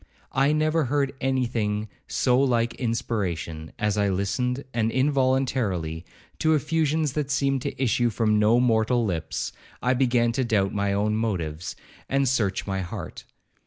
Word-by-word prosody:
I 135 Hz, +2 st, +3 dB
never 155 Hz, 0 st, +2 dB
heard 140 Hz, +1 st, 0 dB
any 130 Hz, -1 st, +1 dB
thing 105 Hz, -3 st, -1 dB, 0.2 s
so 125 Hz, -1 st, +2 dB
like 120 Hz, -3 st, +2 dB
inspiration; 90 Hz, -10 st, -3 dB
as 105 Hz, -2 st, 0 dB
I 100 Hz, -1 st, +2 dB
listened, 125 Hz, +8 st, -1 dB
and 115 Hz, -1 st, +1 dB
involuntarily, 130 Hz, -, 0 dB, 0.3 s
to 160 Hz, 0 st, +3 dB
effusions 155 Hz, 0 st, +1 dB
that 150 Hz, -2 st, -2 dB
seemed 135 Hz, -1 st, +1 dB
to -, -, -5 dB
issue 120 Hz, -2 st, +2 dB
from 110 Hz, -1 st, +1 dB
no 110 Hz, +3 st, +4 dB
mortal 120 Hz, 0 st, +2 dB
lips, 85 Hz, -6 st, -3 dB, 0.3 s
I 125 Hz, +2 st, +2 dB
began 120 Hz, -2 st, +2 dB
to 130 Hz, +2 st, 0 dB
doubt 105 Hz, -5 st, +1 dB
my 100 Hz, -1 st, 0 dB
own 105 Hz, +2 st, +1 dB
motives, 90 Hz, -7 st, -2 dB, 0.3 s
and 135 Hz, 0 st, +2 dB
search 110 Hz, -7 st, 0 dB
my 95 Hz, -1 st, -2 dB
heart. 85 Hz, -, -7 dB
120 Hz, 150 wpm, -25 LUFS, 105-135 Hz, 0.3 s, no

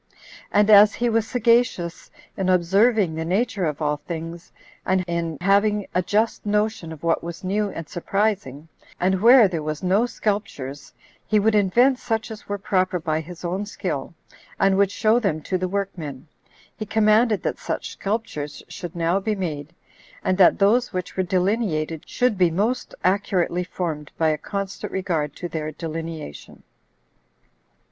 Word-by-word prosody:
And 205 Hz, +1 st, +4 dB
as 210 Hz, 0 st, +8 dB
he 240 Hz, 0 st, 0 dB
was 225 Hz, -1 st, +1 dB
sagacious 230 Hz, -8 st, +1 dB, 0.3 s
in 190 Hz, -1 st, -1 dB
observing 190 Hz, +2 st, +3 dB
the 160 Hz, +1 st, -3 dB
nature 195 Hz, +2 st, 0 dB
of 150 Hz, 0 st, -2 dB
all 150 Hz, 0 st, +1 dB
things, 165 Hz, +2 st, -7 dB, 0.3 s
and 185 Hz, 0 st, +1 dB
in 170 Hz, -2 st, -2 dB
having 205 Hz, +2 st, +3 dB
a 180 Hz, -, +2 dB
just 215 Hz, +5 st, 0 dB
notion 210 Hz, -4 st, -1 dB
of 160 Hz, -1 st, -10 dB
what 165 Hz, -1 st, +1 dB
was 170 Hz, +1 st, -7 dB
new 205 Hz, +2 st, 0 dB
and 165 Hz, -5 st, -7 dB
surprising, 175 Hz, -6 st, -2 dB, 0.3 s
and 190 Hz, +1 st, +1 dB
where 235 Hz, -1 st, +8 dB
there 170 Hz, -4 st, -3 dB
was 155 Hz, +1 st, -4 dB
no 200 Hz, +6 st, +2 dB
sculptures, 200 Hz, -, -4 dB, 0.4 s
he 215 Hz, -, +3 dB
would 220 Hz, +2 st, +2 dB
invent 240 Hz, +6 st, +3 dB
such 225 Hz, -2 st, -2 dB
as 220 Hz, -1 st, -10 dB
were 205 Hz, -, -1 dB
proper 185 Hz, -2 st, 0 dB
by 155 Hz, -1 st, -1 dB
his 175 Hz, +2 st, -10 dB
own 190 Hz, +4 st, -2 dB
skill, 170 Hz, -6 st, -4 dB, 0.4 s
and 195 Hz, 0 st, +4 dB
would 200 Hz, 0 st, +3 dB
show 220 Hz, +3 st, +2 dB
them 195 Hz, -9 st, 0 dB
to 190 Hz, -, -2 dB
the 185 Hz, 0 st, 0 dB
workmen, 175 Hz, -8 st, -4 dB, 0.5 s
he -, -, -5 dB
commanded 215 Hz, +1 st, +3 dB
that -, -, -2 dB
such -, -, -4 dB
sculptures 195 Hz, -9 st, -4 dB
should 175 Hz, 0 st, -8 dB
now 170 Hz, +3 st, +1 dB
be 215 Hz, +2 st, -1 dB
made, 155 Hz, -6 st, -4 dB, 0.5 s
and 185 Hz, -, +1 dB
that 180 Hz, -, +6 dB
those 230 Hz, +5 st, +3 dB
which 185 Hz, -1 st, -4 dB
were 190 Hz, -, +1 dB
delineated 180 Hz, -4 st, -1 dB
should 245 Hz, -6 st, +1 dB
be 180 Hz, -2 st, +5 dB
most 215 Hz, +9 st, -1 dB
accurately 185 Hz, -2 st, +1 dB
formed 165 Hz, -5 st, -4 dB
by 160 Hz, -1 st, +3 dB
a 155 Hz, -, +1 dB
constant 200 Hz, +2 st, -5 dB
regard 165 Hz, -6 st, -2 dB
to 175 Hz, -, -5 dB
their 155 Hz, -2 st, -4 dB
delineation. 160 Hz, -, -7 dB
185 Hz, 160 wpm, -23 LUFS, 165-210 Hz, 0.5 s, as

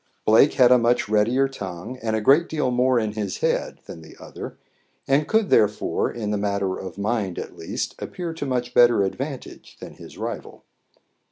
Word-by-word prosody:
Blake 115 Hz, +7 st, +5 dB
had 125 Hz, -2 st, +5 dB
a 125 Hz, -, +7 dB
much 120 Hz, -1 st, +1 dB
readier 115 Hz, +6 st, +2 dB
tongue 100 Hz, -1 st, -7 dB
and 110 Hz, -1 st, -1 dB
a 110 Hz, -, -1 dB
great 145 Hz, +10 st, +4 dB
deal 150 Hz, -5 st, -1 dB
more 125 Hz, +1 st, +2 dB
in 110 Hz, -2 st, -2 dB
his 105 Hz, -3 st, -4 dB
head -, -, -1 dB
than 80 Hz, -, -10 dB
the 80 Hz, -, -15 dB
other, -, -, -9 dB, 0.5 s
and 140 Hz, +2 st, +2 dB
could 220 Hz, -2 st, +1 dB
therefore, 105 Hz, -1 st, +2 dB
in 105 Hz, -3 st, -4 dB
the 105 Hz, -, -1 dB
matter 100 Hz, -2 st, -1 dB
of 95 Hz, -1 st, -8 dB
mind 100 Hz, -3 st, -2 dB
at -, -, -6 dB
least, -, -, -4 dB
appear 175 Hz, -2 st, -5 dB
to 155 Hz, -3 st, -5 dB
much 125 Hz, -1 st, -2 dB
better 120 Hz, -4 st, +5 dB
advantage 135 Hz, +8 st, -6 dB
than -, -, -9 dB
his -, -, -13 dB
rival. -, -, -6 dB
120 Hz, 185 wpm, -23 LUFS, 105-135 Hz, 0.5 s, a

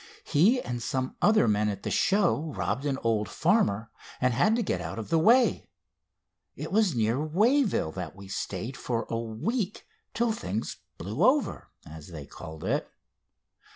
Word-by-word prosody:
He 205 Hz, -, +4 dB
and 120 Hz, -, -4 dB
some 130 Hz, +2 st, -2 dB
other 215 Hz, -, +5 dB
men 105 Hz, 0 st, +2 dB
at 100 Hz, -, -5 dB
the -, -, -3 dB
show 190 Hz, -6 st, +2 dB
robbed 125 Hz, +9 st, -1 dB
an 135 Hz, -2 st, 0 dB
old 110 Hz, -3 st, +1 dB
farmer, 105 Hz, +3 st, +1 dB, 0.3 s
and 125 Hz, -1 st, +2 dB
had 175 Hz, -, +3 dB
to 235 Hz, -, 0 dB
get -, -, -1 dB
out -, -, -5 dB
of 110 Hz, -, -6 dB
the 165 Hz, -, +3 dB
way. 230 Hz, -, +4 dB, 0.9 s
It 150 Hz, +3 st, -6 dB
was 200 Hz, -, +2 dB
near 115 Hz, +5 st, +1 dB
Wayville 210 Hz, -, +2 dB
that 90 Hz, -1 st, -6 dB
we 100 Hz, 0 st, -11 dB
stayed 100 Hz, +5 st, -4 dB
for 115 Hz, -2 st, -2 dB
a 115 Hz, -, 0 dB
week, 185 Hz, -, -3 dB, 0.3 s
till 235 Hz, 0 st, +2 dB
things 110 Hz, -, -4 dB, 0.2 s
'blew 110 Hz, -, -2 dB
over,' 270 Hz, +4 st, +2 dB, 0.2 s
as 80 Hz, 0 st, -10 dB
they 80 Hz, -5 st, -8 dB
called 80 Hz, +1 st, -10 dB
it. -, -, -1 dB
125 Hz, 165 wpm, -28 LUFS, -, 0.9 s, other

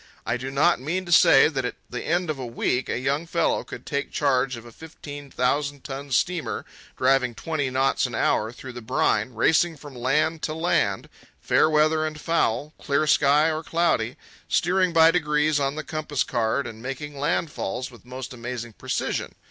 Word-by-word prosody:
I 120 Hz, -, 0 dB
do 130 Hz, +2 st, -4 dB
not 150 Hz, +6 st, +3 dB
mean 180 Hz, +7 st, -2 dB
to 175 Hz, -, -6 dB
say 170 Hz, -, +7 dB
that -, -, -2 dB
at -, -, -3 dB
the -, -, -5 dB
end 175 Hz, -1 st, 0 dB
of 145 Hz, -, -6 dB
a 130 Hz, -, -4 dB
week 125 Hz, +2 st, -1 dB
a -, -, -1 dB
young 140 Hz, +6 st, -1 dB
fellow 165 Hz, 0 st, +1 dB
could -, -, -10 dB
take 140 Hz, -2 st, -3 dB
charge 135 Hz, -3 st, +1 dB
of 115 Hz, -, -11 dB
a 120 Hz, -, -11 dB
fifteen 145 Hz, 0 st, -10 dB
thousand 140 Hz, +2 st, -1 dB
ton 140 Hz, +1 st, -6 dB
steamer, 165 Hz, +6 st, -1 dB, 0.3 s
driving 130 Hz, -3 st, +2 dB
twenty 150 Hz, -2 st, -2 dB
knots 130 Hz, 0 st, +1 dB
an 120 Hz, -, -6 dB
hour 110 Hz, 0 st, +1 dB
through 130 Hz, +2 st, -9 dB
the 120 Hz, -, -7 dB
brine, 110 Hz, +1 st, 0 dB
racing 160 Hz, +7 st, +3 dB
from 145 Hz, -1 st, -11 dB
land 150 Hz, +6 st, 0 dB
to 155 Hz, -, -3 dB
land, 160 Hz, -, 0 dB, 0.3 s
fair -, -, +3 dB
weather 155 Hz, +1 st, +3 dB
and 155 Hz, -1 st, -4 dB
foul, 150 Hz, -3 st, 0 dB
clear 140 Hz, +1 st, +1 dB
sky 150 Hz, +1 st, +4 dB
or 155 Hz, 0 st, -2 dB
cloudy, 160 Hz, -9 st, 0 dB, 0.3 s
steering 185 Hz, +1 st, +2 dB
by 165 Hz, 0 st, +6 dB
degrees 150 Hz, -3 st, +1 dB
on 140 Hz, 0 st, 0 dB
the 155 Hz, -, -4 dB
compass 155 Hz, -4 st, -2 dB
card 120 Hz, +4 st, 0 dB
and 110 Hz, 0 st, -8 dB
making 135 Hz, +4 st, -5 dB
landfalls 140 Hz, -, -2 dB
with 120 Hz, -, -16 dB
most 130 Hz, +1 st, -7 dB
amazing 120 Hz, -1 st, -6 dB
precision. -, -, -3 dB
145 Hz, 185 wpm, -24 LUFS, 125-155 Hz, 0.3 s, say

